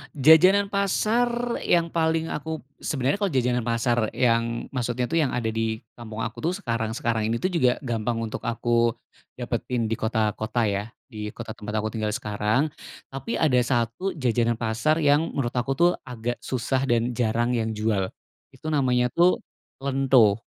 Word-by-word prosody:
Jajanan 185 Hz, +8 st, +6 dB
pasar 235 Hz, +5 st, +1 dB
yang 170 Hz, -1 st, +1 dB
paling 160 Hz, 0 st, 0 dB
aku, 160 Hz, +1 st, -4 dB, 0.2 s
sebenarnya 140 Hz, +5 st, -1 dB
kalau 200 Hz, -6 st, 0 dB
jajanan 125 Hz, -2 st, +1 dB
pasar 120 Hz, -1 st, +1 dB
yang 115 Hz, -1 st, +1 dB
maksudnya 125 Hz, -1 st, -1 dB
tuh 165 Hz, -, +1 dB
yang 145 Hz, -6 st, +1 dB
ada 115 Hz, -2 st, -1 dB
di 110 Hz, 0 st, -2 dB
kampung 115 Hz, 0 st, -6 dB
aku 115 Hz, -1 st, -5 dB
tuh, 175 Hz, -, +1 dB
sekarang-sekarang 115 Hz, -1 st, -1 dB
ini 115 Hz, -, 0 dB
tuh 185 Hz, -, 0 dB
juga 130 Hz, -8 st, +3 dB
gampang 120 Hz, -1 st, -1 dB
untuk 110 Hz, -, -4 dB
aku 115 Hz, 0 st, +1 dB, 0.4 s
dapetin 115 Hz, -3 st, -2 dB
di -, -, +2 dB
kota-kota 110 Hz, +1 st, 0 dB
ya, 100 Hz, -1 st, 0 dB, 0.3 s
di 105 Hz, -1 st, -5 dB
kota 115 Hz, -2 st, -6 dB
tempat 105 Hz, 0 st, -7 dB
aku 110 Hz, -, -2 dB
tinggal 105 Hz, -1 st, -2 dB
sekarang. 110 Hz, +5 st, 0 dB, 0.4 s
Tapi 135 Hz, +12 st, -4 dB
ada 130 Hz, -6 st, +3 dB
satu 120 Hz, -, -1 dB
jajanan 120 Hz, -4 st, +1 dB
pasar 115 Hz, +7 st, +1 dB
yang 145 Hz, +3 st, +4 dB
menurut 120 Hz, -4 st, -1 dB
aku 135 Hz, +3 st, 0 dB
tuh, 175 Hz, +4 st, +4 dB, 0.2 s
agak 120 Hz, 0 st, -4 dB
susah 130 Hz, +1 st, -1 dB
dan 120 Hz, +1 st, +1 dB
jarang 120 Hz, 0 st, 0 dB
yang 110 Hz, -2 st, -1 dB
jual. 105 Hz, -3 st, 0 dB, 0.5 s
Itu 155 Hz, -, -5 dB
namanya 125 Hz, -4 st, +2 dB
tuh 175 Hz, +2 st, +3 dB, 0.4 s
lento. 130 Hz, -6 st, +4 dB
120 Hz, 160 wpm, -25 LUFS, 115-145 Hz, 0.5 s, Jajanan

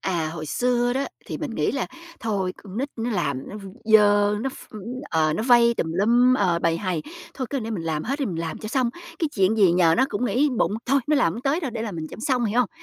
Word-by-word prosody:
À, 170 Hz, -4 st, -1 dB
hồi 155 Hz, -2 st, -6 dB
xưa 245 Hz, +5 st, +1 dB
đó, 270 Hz, +2 st, -1 dB, 0.2 s
thì -, -, -5 dB
mình -, -, -4 dB
nghĩ -, -, 0 dB
là -, -, -1 dB, 0.3 s
thôi 200 Hz, -5 st, -1 dB
con 195 Hz, -1 st, -11 dB
nít 275 Hz, +3 st, -1 dB
nó 230 Hz, +1 st, -2 dB
làm 140 Hz, -, -2 dB
nó -, -, -7 dB
v 210 Hz, -, -9 dB, 0.2 s
dơ, 205 Hz, -1 st, +5 dB
nó 265 Hz, +3 st, -2 dB
ph -, -, -14 dB, 0.4 s
ờ, 155 Hz, -1 st, +2 dB
nó 190 Hz, -, -1 dB
vây 235 Hz, -1 st, +5 dB
tùm 160 Hz, -7 st, -2 dB
lum, 240 Hz, +7 st, +4 dB
ờ, 185 Hz, -7 st, +2 dB
bầy 165 Hz, 0 st, +1 dB
hầy. 180 Hz, -5 st, -2 dB, 0.3 s
Thôi 260 Hz, -, -3 dB
cứ 280 Hz, -, -1 dB
để 225 Hz, 0 st, -5 dB
mình 200 Hz, -7 st, -3 dB
làm 155 Hz, -2 st, -1 dB
hết 275 Hz, +4 st, -2 dB
đi, 275 Hz, -, +1 dB
mình 175 Hz, -4 st, -4 dB
làm 165 Hz, -1 st, -4 dB
cho 215 Hz, -, -6 dB
xong. 250 Hz, 0 st, +1 dB, 0.3 s
Cái 320 Hz, -, 0 dB
chuyện 195 Hz, +2 st, +3 dB
gì 195 Hz, -5 st, +5 dB
nhờ 170 Hz, -2 st, +4 dB
nó 260 Hz, -, +4 dB
cũng 205 Hz, -, -2 dB
nghĩ 265 Hz, +4 st, +2 dB
bụng -, -, +2 dB
"Thôi, 275 Hz, +2 st, +3 dB
nó 300 Hz, 0 st, +3 dB
làm 205 Hz, -12 st, +3 dB
hông 230 Hz, +7 st, -7 dB
tới 285 Hz, +5 st, +1 dB
đâu 290 Hz, -7 st, -3 dB
để 225 Hz, -1 st, -4 dB
làm 210 Hz, -6 st, -4 dB
mình 160 Hz, -1 st, -4 dB
cho -, -, -8 dB
xong", 255 Hz, -2 st, +1 dB
hiểu 225 Hz, +3 st, +2 dB
hông? 250 Hz, -, +1 dB
220 Hz, 270 wpm, -24 LUFS, 175-250 Hz, 0.4 s, dơ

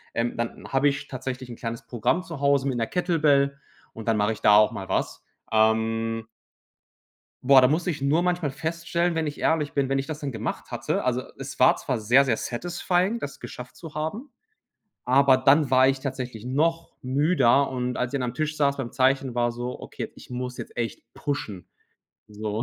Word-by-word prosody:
ähm, 120 Hz, +1 st, -1 dB
dann 115 Hz, 0 st, -4 dB
habe 135 Hz, +2 st, +3 dB
ich 140 Hz, 0 st, -1 dB
tatsächlich 130 Hz, -1 st, -6 dB
'n 120 Hz, -, -7 dB
kleines 115 Hz, 0 st, -5 dB
Programm 120 Hz, +10 st, 0 dB
zu 165 Hz, -6 st, -8 dB
Hause 140 Hz, -1 st, +3 dB
mit 130 Hz, -3 st, -1 dB
'ner 115 Hz, -, 0 dB
Kettlebell 150 Hz, -6 st, +2 dB, 0.3 s
und 110 Hz, 0 st, -9 dB
dann 110 Hz, -1 st, +2 dB
mache 105 Hz, +2 st, +2 dB
ich 110 Hz, -, -11 dB
da 105 Hz, -, +6 dB
auch 105 Hz, 0 st, +6 dB
mal 95 Hz, -1 st, -7 dB
was. -, -, -2 dB, 0.3 s
Ähm 110 Hz, +1 st, +1 dB, 1.2 s
Boah, 135 Hz, 0 st, +7 dB
da 125 Hz, -, +6 dB
muss 160 Hz, +5 st, 0 dB
ich 150 Hz, -5 st, -2 dB
nur 155 Hz, +5 st, +2 dB
manchmal 175 Hz, -4 st, 0 dB
feststellen, 170 Hz, +3 st, -1 dB
wenn 160 Hz, -1 st, -1 dB
ich 145 Hz, -, -6 dB
ehrlich 155 Hz, -3 st, +1 dB
bin, 140 Hz, -2 st, +1 dB
wenn 135 Hz, 0 st, +1 dB
ich 135 Hz, -, -4 dB
das 155 Hz, -1 st, -5 dB
dann 140 Hz, -3 st, -4 dB
gemacht 110 Hz, -2 st, -5 dB
hatte. -, -, -2 dB
Also, -, -, 0 dB, 0.2 s
es -, -, -8 dB
war -, -, +6 dB
zwar 125 Hz, -, -3 dB
sehr, 125 Hz, +6 st, +4 dB
sehr 115 Hz, -4 st, +1 dB
satisfying, 175 Hz, -, -1 dB
das 140 Hz, -, -6 dB
geschafft 125 Hz, 0 st, -9 dB
zu 165 Hz, -3 st, -10 dB
haben, 180 Hz, -, -4 dB, 0.8 s
aber 135 Hz, +1 st, +5 dB
dann 135 Hz, +3 st, +4 dB
war 130 Hz, 0 st, +6 dB
ich 135 Hz, 0 st, 0 dB
tatsächlich 125 Hz, -5 st, -5 dB
noch 165 Hz, +6 st, 0 dB
müder 140 Hz, 0 st, +3 dB
und 125 Hz, -1 st, -2 dB
als 125 Hz, +1 st, -2 dB
ich 140 Hz, -, 0 dB
dann 125 Hz, -, -1 dB
am 125 Hz, -, -13 dB
Tisch 155 Hz, +1 st, -2 dB
saß 140 Hz, -1 st, +2 dB
beim 125 Hz, -3 st, -4 dB
Zeichen, 130 Hz, -1 st, +1 dB
war 120 Hz, 0 st, +1 dB
so: 120 Hz, +1 st, -5 dB
„Okay, -, -, -6 dB
ich -, -, -14 dB
muss 125 Hz, 0 st, -4 dB
jetzt -, -, -8 dB
echt 115 Hz, -1 st, -3 dB
pushen“, 110 Hz, -10 st, -4 dB, 0.6 s
so. 105 Hz, +1 st, -3 dB
135 Hz, 200 wpm, -25 LUFS, 120-150 Hz, 1.2 s, Boah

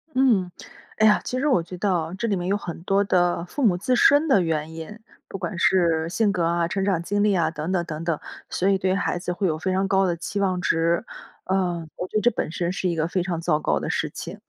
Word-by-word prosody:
嗯， 225 Hz, -9 st, +3 dB, 0.5 s
哎 220 Hz, -, +4 dB
呀， 210 Hz, -1 st, +5 dB
其 255 Hz, -, -3 dB
实 300 Hz, -, 0 dB
我 185 Hz, -12 st, +3 dB
觉 180 Hz, +2 st, -9 dB
得 200 Hz, +2 st, 0 dB
啊， 165 Hz, 0 st, -2 dB
这 230 Hz, -, -1 dB
里 200 Hz, -, +1 dB
面 180 Hz, 0 st, -3 dB
有 200 Hz, -, +2 dB
很 170 Hz, -4 st, -7 dB
多 195 Hz, +2 st, +2 dB
的 175 Hz, -3 st, +1 dB
父 280 Hz, +9 st, -4 dB
母 180 Hz, -4 st, +3 dB
自 250 Hz, +7 st, 0 dB
身 290 Hz, +6 st, +5 dB
的 265 Hz, -9 st, +4 dB
原 160 Hz, -2 st, -2 dB
因， 165 Hz, +7 st, -8 dB, 0.3 s
不 195 Hz, -, -6 dB
管 190 Hz, -1 st, -4 dB
是 170 Hz, -4 st, +2 dB
性 205 Hz, +3 st, +1 dB
格 180 Hz, -3 st, -1 dB
啊， 170 Hz, 0 st, +1 dB
成 195 Hz, +3 st, -2 dB
长 190 Hz, -4 st, +1 dB
经 205 Hz, +3 st, 0 dB
历 210 Hz, -2 st, +3 dB
啊， 165 Hz, -3 st, +1 dB
等 160 Hz, +2 st, -4 dB
等 180 Hz, -2 st, +1 dB
等 155 Hz, 0 st, -6 dB
等， 165 Hz, -3 st, -1 dB, 0.3 s
所 185 Hz, -, -1 dB
以 195 Hz, -, +3 dB
对 190 Hz, 0 st, 0 dB
孩 195 Hz, -3 st, -1 dB
子 180 Hz, -, -3 dB
会 185 Hz, +2 st, -1 dB
有 155 Hz, -2 st, -1 dB
非 185 Hz, +3 st, -1 dB
常 190 Hz, +1 st, +1 dB
高 195 Hz, 0 st, +3 dB
的 175 Hz, -2 st, 0 dB
期 175 Hz, +4 st, -4 dB
望 185 Hz, -2 st, +1 dB
值。 165 Hz, +2 st, +1 dB, 0.4 s
呃， 180 Hz, -3 st, -1 dB
我 180 Hz, -, -4 dB
觉 -, -, -2 dB
得 -, -, +1 dB
这 240 Hz, -, +4 dB
本 -, -, -3 dB
身 175 Hz, +1 st, -2 dB
是 185 Hz, 0 st, -1 dB
一 170 Hz, -, -1 dB
个 160 Hz, 0 st, 0 dB
非 180 Hz, +1 st, -1 dB
常 175 Hz, -3 st, -3 dB
糟 160 Hz, -2 st, +1 dB
糕 -, -, 0 dB
的 -, -, -4 dB
事 -, -, -1 dB
情， -, -, -8 dB
180 Hz, 285 characters per minute, -24 LUFS, 170-200 Hz, 0.5 s, 呀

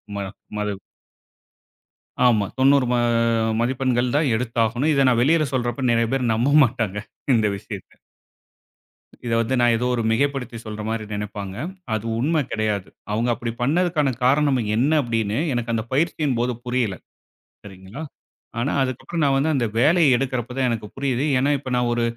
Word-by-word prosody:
ம -, -, -3 dB, 0.4 s
மதி 105 Hz, -1 st, -2 dB, 1.5 s
ஆமா. 110 Hz, -4 st, +4 dB
தொண்ணூறு 135 Hz, 0 st, +5 dB
ம -, -, +2 dB, 0.6 s
மதிப்பெண்கள் 125 Hz, 0 st, 0 dB
தான் 150 Hz, -1 st, +2 dB
எடுத்தாகணும். 120 Hz, +4 st, 0 dB
இத 140 Hz, -1 st, +3 dB
நான் 120 Hz, -2 st, +2 dB
வெளியில 155 Hz, +3 st, +3 dB
சொல்றப்ப 125 Hz, +1 st, -1 dB
நெறையா 115 Hz, -1 st, +2 dB
பேர் 130 Hz, -3 st, 0 dB
நம்ப 125 Hz, +6 st, +2 dB
மாட்டாங்க. 110 Hz, -4 st, -3 dB, 0.4 s
இந்த 110 Hz, -2 st, +2 dB
விஷயத்தை. 100 Hz, -2 st, -10 dB, 1.3 s
இத 120 Hz, -, -2 dB
வந்து 115 Hz, +3 st, 0 dB
நான் 120 Hz, -1 st, +4 dB
ஏதோ 125 Hz, -, -2 dB
ஒரு 120 Hz, -, -1 dB
மிகைப்படுத்தி 125 Hz, -1 st, -1 dB
சொல்ற 110 Hz, -1 st, -6 dB
மாரி 110 Hz, -1 st, -2 dB
நெனைப்பாங்க. 100 Hz, -2 st, -5 dB, 0.4 s
அது 110 Hz, 0 st, -2 dB
உண்மை 155 Hz, +5 st, +1 dB
கெடையாது. 105 Hz, -3 st, -1 dB, 0.2 s
அவுங்க 115 Hz, +3 st, 0 dB
அப்படி 115 Hz, 0 st, -4 dB
பண்ணதுக்கான 155 Hz, +1 st, +2 dB, 0.2 s
காரணம் 140 Hz, 0 st, +3 dB, 0.2 s
என்னா? 140 Hz, +8 st, +2 dB
அப்படின்னு 115 Hz, -2 st, -1 dB, 0.2 s
எனக்கு 120 Hz, -1 st, -2 dB
அந்தப் 115 Hz, +1 st, -3 dB
பயிற்சியின் 150 Hz, -4 st, 0 dB
போது 125 Hz, +1 st, 0 dB
புரியல. 120 Hz, -5 st, 0 dB, 0.7 s
சரிங்களா! 95 Hz, +6 st, -10 dB, 0.6 s
ஆனா 135 Hz, +5 st, 0 dB
அதுக்கப்புறம் 135 Hz, +5 st, -2 dB
நான் 135 Hz, -1 st, +3 dB
வந்து 155 Hz, +4 st, +1 dB
அந்த 125 Hz, -3 st, +1 dB
வேலைய 150 Hz, 0 st, +5 dB
எடுக்கிறப்பதான் 130 Hz, 0 st, -2 dB
எனக்குப் 110 Hz, -3 st, -4 dB
புரியுது. 135 Hz, -1 st, 0 dB
ஏன்னா 135 Hz, +3 st, +2 dB
இப்ப 130 Hz, -, -7 dB
நான் 125 Hz, -1 st, +1 dB
ஒரு 120 Hz, -, 0 dB
120 Hz, 150 wpm, -22 LUFS, 115-135 Hz, 1.5 s, தொண்ணூறு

